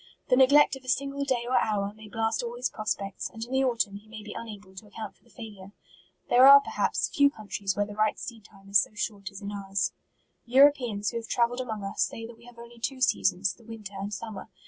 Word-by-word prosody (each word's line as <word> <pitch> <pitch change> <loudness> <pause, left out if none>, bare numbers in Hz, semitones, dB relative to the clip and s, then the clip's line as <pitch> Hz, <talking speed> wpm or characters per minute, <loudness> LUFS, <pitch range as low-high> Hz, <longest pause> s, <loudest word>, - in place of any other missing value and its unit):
The 250 - +5
ne 260 0 +7
glect 290 0 +5
of 270 - -12
a - - -16
single 280 +2 -1
day 250 -3 0
or 255 - +3
hour, 200 -1 -1
may 215 0 -13
blast 225 +1 -1
all 240 0 -5
his 245 +1 -2
prospects, 200 -2 -3
and 225 0 -6
in 245 - -14
the 265 0 +2
autumn 230 -6 0
he 210 +2 -17
may 215 -1 -10
be 210 - -8
unable 205 -4 -9
to 210 - -10
account 215 +1 -8
for - - -33
the 235 - -25
failure. 205 -5 -11 0.5
There 255 +2 +7
are, 280 0 +11
perhaps, 280 - -1
few 285 -1 +4
countries 205 -5 -4
where 205 - +1
the 205 - -9
right 215 0 +1
seed 225 -4 -8
time 195 -1 -18
is 200 0 +5
so 210 - -7
short 205 -2 -4
as 195 +1 -11
in 200 - -4
ours. 195 -1 -2 0.5
Europeans 245 -5 +4
who - - -4
have 230 -1 -6
travelled 245 +1 +1
among 220 -5 -5
us, 195 - -3
say 225 - -1
that 230 +1 -10
we 235 - -17
have 245 -1 -15
only 235 0 -12
two 260 +3 -3
seasons, 195 -5 +2
the 235 - -21
winter 215 -3 -9
and 195 +1 -5
summer. 210 -1 -7
225 Hz, 245 wpm, -27 LUFS, 205-245 Hz, 0.5 s, are